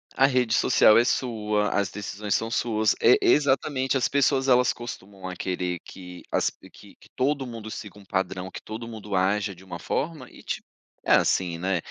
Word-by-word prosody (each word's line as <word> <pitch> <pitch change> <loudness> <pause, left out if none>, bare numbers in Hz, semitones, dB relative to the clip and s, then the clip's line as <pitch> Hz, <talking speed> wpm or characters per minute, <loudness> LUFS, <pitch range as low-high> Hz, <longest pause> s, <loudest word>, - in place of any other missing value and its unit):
a 135 - +5
rede 125 -4 +1
social 105 - +5
é - - +5
sua, 105 -5 0
as 100 -1 +1
decisões 105 0 -3
são 115 0 -2
suas. 110 -3 +1
É, - - +7
exatamente, 140 - +2
as 130 - +1
pessoas 135 -1 +2
elas 125 -1 +4
costumam 100 -5 -8
a 90 - -5
querer 90 -1 -3
que 90 -1 -11
as - - +1
que - - -17
que - - -21
todo 135 0 0
mundo 115 -2 -8
siga 105 -1 -8
um 100 - -15
padrão, 95 -1 -3
que - - -8
todo 110 +2 -7
mundo 105 -3 -6
aja 100 +1 +1
de 90 - -16
uma 90 -2 -8
forma 150 -3 -3
e, - - -15
ti - - -4 0.4
é - - +3
assim, 90 -3 +2
né. 95 +2 0
105 Hz, 190 wpm, -25 LUFS, 95-125 Hz, 0.4 s, É